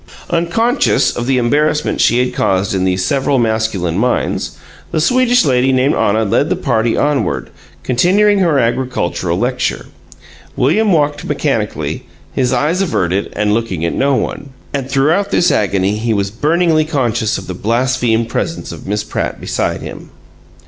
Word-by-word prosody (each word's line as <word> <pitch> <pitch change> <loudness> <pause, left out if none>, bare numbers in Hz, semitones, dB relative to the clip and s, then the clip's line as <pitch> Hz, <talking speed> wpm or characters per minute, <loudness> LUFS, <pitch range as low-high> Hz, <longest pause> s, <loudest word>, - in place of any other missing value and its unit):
Unconscious 170 - +1
of 120 0 -3
the 135 -1 +2
embarrassment 150 +5 +1
she 120 - +3
had 125 0 0
caused 95 +1 0
in 95 -1 0
these 90 0 0
several 140 0 +1
masculine 110 -7 0
minds, 125 +2 -1 0.3
the - - -1
Swedish 245 +3 +3
lady 130 -1 +2
named 130 +3 +2
Anna 110 +2 +1
led 100 - +1
the - - +1
party 115 +1 0
onward, 145 -2 0 0.3
continuing 195 +11 +3
her 170 -6 +2
agricultural 115 -8 -1
lecture. 125 +4 -1 0.7
William 200 - +2
walked 145 -3 +1
mechanically, - - -2 0.3
his 125 -2 0
eyes 150 +9 +1
averted 100 - -1
and 105 0 +1
looking 105 -8 -1
at 85 - -1
no 140 0 +1
one. 140 - -3 0.2
And 135 -2 -3
throughout 155 +9 +2
this 180 -2 +2
agony 100 0 +1
he 110 0 -1
was 100 -1 -1
burningly 155 - +2
conscious 120 -8 0
of 95 - -8
the 90 - -5
blasphemed 115 +2 0
presence 165 +7 -3
of - - -10
Miss 105 +1 -1
Pratt - - -4
beside - - -2
him. - - -9
125 Hz, 155 wpm, -15 LUFS, 110-150 Hz, 0.7 s, she